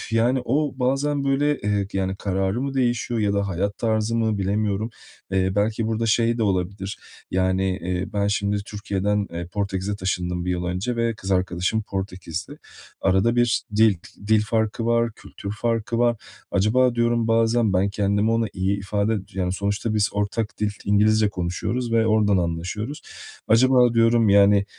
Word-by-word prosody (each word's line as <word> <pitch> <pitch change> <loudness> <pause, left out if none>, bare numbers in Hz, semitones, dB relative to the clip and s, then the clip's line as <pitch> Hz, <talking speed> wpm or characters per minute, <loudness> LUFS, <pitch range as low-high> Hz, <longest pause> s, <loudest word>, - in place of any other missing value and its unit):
yani, 120 +3 +2
o 145 +3 0
bazen, 140 +3 0
böyle, 145 +2 +1
eee, 105 -1 0
yani, 95 0 -1
kararı 95 +4 -1
mı 140 0 -3
değişiyor 120 -2 0
ya 100 -1 +1
da 100 0 0
hayat 100 +3 -2
tarzı 110 0 0
mı, 110 -3 0
bilemiyorum. 105 +2 -1 0.4
Eee, 95 -1 +1
belki 110 +2 0
burada 115 +1 -1
şey 115 +1 +2
de - - +1
olabilir, 95 0 -2 0.3
yani, 95 0 +1
eee, 90 +1 -3
ben 100 -1 0
şimdi 100 0 0
Türkiye'den, 105 -1 -1
eee, 85 0 -4
Portekiz'e 100 +1 -3
taşındım 90 -2 -2
1 90 - -1
yıl 90 0 -2
önce 90 +8 -2
ve 115 0 0
kız 95 -2 -7
arkadaşım 95 +3 0
Portekizli. 95 -3 -5 0.4
Arada 95 +5 +2
bir 120 -1 +2
dil 110 -3 +5 0.3
dil 110 -1 +4
farkı 110 +1 -1
var, 115 0 +2
kültür 100 - -9
farkı 115 0 -1
var. 120 -1 +3 0.3
Acaba, 120 +6 +2
diyorum, 120 -1 +1
bazen 115 -1 +2
ben 95 +2 +2
kendimi 100 +2 +1
ona 115 0 +1
iyi 95 +2 -1
ifade 100 +2 0 0.2
yani, 90 -2 -1
sonuçta 100 +3 -2
biz 105 -1 +2
ortak 105 +2 -2
dil 105 -1 +1
İngilizce 105 +1 +3
konuşuyoruz 100 +7 -3
ve 115 -1 +3
oradan 105 -2 +3
anlaşıyoruz. 90 - -3 0.5
Acaba, 125 +1 +5
diyorum, 115 -1 +4
yani, 100 0 +5
105 Hz, 160 wpm, -23 LUFS, 95-115 Hz, 0.5 s, dil